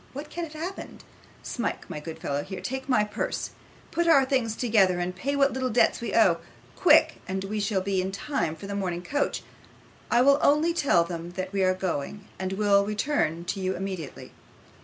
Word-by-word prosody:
What 285 +3 -7
can 345 -1 -3
have 310 - -12
happened? 340 +5 -7 0.4
Smike, 240 - -3
my 150 - -5
good 160 +1 -7
fellow, 140 0 -2
here 190 +4 -7
take 265 +1 -5
my 250 -5 +4
purse. 210 0 -3 0.4
Put 340 0 0
our 280 -5 +6
things 255 -5 0
together, 205 -7 +3
and 180 +1 -2
pay 280 +9 -2
what 275 0 +3
little 260 -1 -1
debts 240 0 +3
we 235 - -3
owe 185 -7 +5 0.4
quick, 315 -2 +5
and 190 0 -2
we 210 +2 -3
shall 200 -2 0
be 190 0 0
in 190 +1 -3
time 200 - -2
for 160 - -10
the 200 - -5
morning 180 -3 -2
coach. 285 +10 -1 0.7
I 240 +1 +4
will 280 +1 +5
only 305 +4 +4
tell 280 - +3
them 170 0 -6
that 185 +1 -5
we 195 -1 +1
are 185 0 +3
going, 185 +2 -4
and 190 0 -2
will 200 0 +4
return 205 - -1
to 195 - -3
you 185 0 -1
immediately. 185 -6 -6
200 Hz, 200 wpm, -27 LUFS, 185-270 Hz, 0.7 s, our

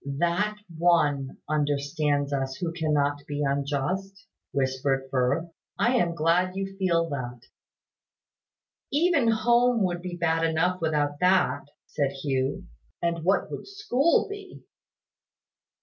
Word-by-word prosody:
"That 185 +6 +1 0.2
One 145 -6 +2
understands 145 -1 0
us 135 -1 -1
who 165 +3 -3
cannot 145 -3 0
be 145 0 -2
unjust!" 145 +8 -2 0.3
whispered 135 0 0
Firth. 140 +6 0 0.3
"I 245 +2 +3
am 170 -6 +1
glad 175 +3 +2
you 195 0 -4
feel 170 -3 +2
that." 125 -4 -5 1.5
"Even 295 -3 +3
home 235 +1 +3
would 175 -2 -1
be 180 0 -5
bad 165 -1 +1
enough 165 +3 +1
without 145 -2 0
that," 160 -7 +2 0.2
said 140 -2 -1
Hugh. 135 -1 -1 0.3
"And 170 -1 -1
what 195 +3 +1
would - - -6
school 335 -7 +2
be?" 405 -2 -9
165 Hz, 120 wpm, -26 LUFS, 140-190 Hz, 1.5 s, I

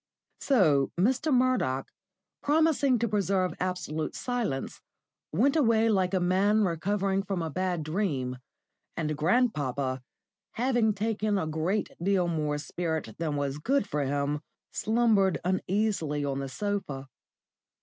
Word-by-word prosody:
So 155 - +3
Mr. 260 - +2
Murdoch, 250 - +2 0.5
promising 295 -3 +3
to 235 +1 0
preserve 195 -3 +1
absolute 180 -4 -3
silence, 235 - -3 0.5
went 255 - +2
away 230 -6 +3
like 190 -3 +2
a - - +3
man 195 +4 +3
recovering 195 +2 0
from 190 -3 -3
a 160 - -3
bad 180 -1 -1
dream, 150 -7 -1 0.6
and 155 -2 -1
grandpapa, 145 - +1 0.5
having 240 -3 +1
taken 215 0 0
a 185 - -1
great 160 +7 -1
deal 185 -1 +2
more 150 -3 -1
spirit 160 -5 -3
than 155 -3 -1
was 140 0 -2
good 260 - +1
for 150 -5 -1
him, 140 +1 -1 0.3
slumbered 220 -4 +2
uneasily 185 -5 0
on 135 -1 -2
the 135 -1 -4
sofa. 150 -5 -3
185 Hz, 125 wpm, -28 LUFS, 150-215 Hz, 0.6 s, So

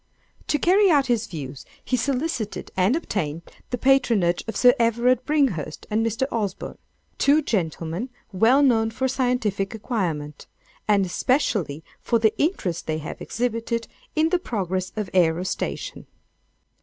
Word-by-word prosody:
To 295 - +2
carry 385 +5 +4
out 285 -5 +4
his 235 -3 0
views, 140 -5 -7 0.2
he 255 - +1
solicited 255 -3 -2
and 190 +7 +3
obtained 170 - -3 0.3
the 245 - -2
patronage 235 -9 +3
of 225 - -4
Sir 245 -1 +7
Everard 235 +2 +2
Bringhurst 250 - 0
and 220 +2 +2
Mr. 230 +3 0
Osborne, 205 -5 -3 0.4
two 295 +2 +4
gentlemen 170 - -2 0.2
well 230 +9 +4
known 225 -4 +3
for 260 +4 -1
scientific 245 -6 -1
acquirement, 170 - -3 0.4
and 200 -2 +3
especially 180 - 0 0.2
for 235 - +1
the 220 -1 +2
interest 190 - -1
they 155 0 -1
have 155 - -7
exhibited 230 -1 -2 0.3
in 315 +1 +3
the 360 - +2
progress 190 - -3
of 210 -3 -2
ærostation. 180 - -1
225 Hz, 135 wpm, -24 LUFS, 185-260 Hz, 0.4 s, Sir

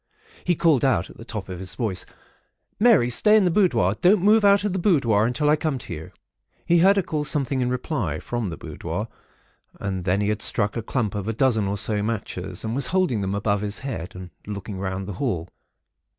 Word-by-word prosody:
He 175 - +2
called 160 -5 +3
out 130 -10 +1
at - - -16
the - - -10
top 110 -4 -6
of 90 -2 -6
his 95 0 -6
voice:—'Mary, 125 - -1
stay 210 - +5
in 210 - +4
the 180 - +2
boudoir. 165 - +3
Don't 185 +1 +4
move 215 +2 +5
out 200 0 +5
of 205 -3 -1
the 190 - -1
boudoir 120 - +3
until 145 +5 0
I 150 - +5
come 155 -2 -2
to 115 - -7
you.' 80 0 -8 0.5
He 170 0 +4
heard 195 +4 +6
her 195 - +1
call 155 -3 -2
something 140 -3 0
in 125 - 0
reply, 125 - -2
from 120 -5 -3
the 80 - -6
boudoir, - - -5 0.7
and 95 -2 -3
then 95 +2 +1
he 105 0 0
had 105 0 -1
struck 105 -3 0
a 115 - -2
clump 115 -2 -2
of 105 -1 -4
a 115 - -1
dozen, 110 -4 +2
or 100 +1 -2
so, 105 0 0
matches, 100 -4 -4
and 110 0 -3
was 130 0 0
holding 180 - +1
them 95 0 -2
above 100 -1 0
his 105 0 -4
head, 95 -10 -5
and 90 -1 -9 0.2
looking 100 -1 -6
round 95 0 -3
the 100 - -4
hall. 90 - -1
115 Hz, 220 wpm, -24 LUFS, 100-155 Hz, 0.7 s, heard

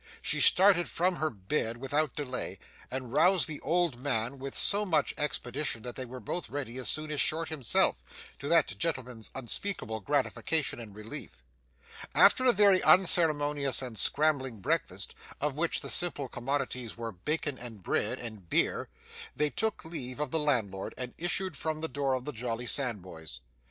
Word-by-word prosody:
She - - +1
started 185 -2 +6
from 180 +1 +1
her 155 - 0
bed 115 +3 -2
without 140 +3 -1
delay, 125 -9 -3 0.3
and 130 -1 -5
roused 180 +5 +5
the 150 -2 -5
old 170 -5 0
man 130 -1 -1
with 135 0 -5
so 205 +1 +4
much 180 -6 +1
expedition 135 -4 -2
that 125 -1 -6
they 130 - -5
were 130 +1 -9
both 150 +10 -3
ready 130 -3 -5
as 130 - 0
soon 155 0 +1
as 145 -3 0
Short 160 +1 +1
himself, 130 - +2 0.4
to 140 - -5
that 165 -3 +4
gentleman's 125 -8 -3
unspeakable 130 - -2
gratification 145 +4 0
and 105 -4 -10
relief. 105 - -8 0.7
After 255 - +6
a 250 - +7
very 200 -3 +5
unceremonious 150 -7 +4
and 125 -3 -6
scrambling 130 0 +2
breakfast, 95 - -1 0.3
of 145 -1 -1
which 165 +2 0
the - - -6
staple 155 -6 0
commodities 125 -2 -3
were 115 -1 -4
bacon 145 - -3
and 115 -6 -9
bread, - - -1
and 110 -7 -8
beer, - - +1 0.5
they 150 -1 +1
took 220 -5 -2
leave 130 -6 -5
of 150 -3 -2
the 160 - +1
landlord 110 -10 0
and 125 -1 -5
issued 180 +2 -1
from 155 0 -3
the 160 - -1
door 135 -1 -1
of 130 -1 -5
the 150 - -4
jolly 120 0 -3
Sandboys. 90 - -2
140 Hz, 165 wpm, -30 LUFS, 120-155 Hz, 0.7 s, a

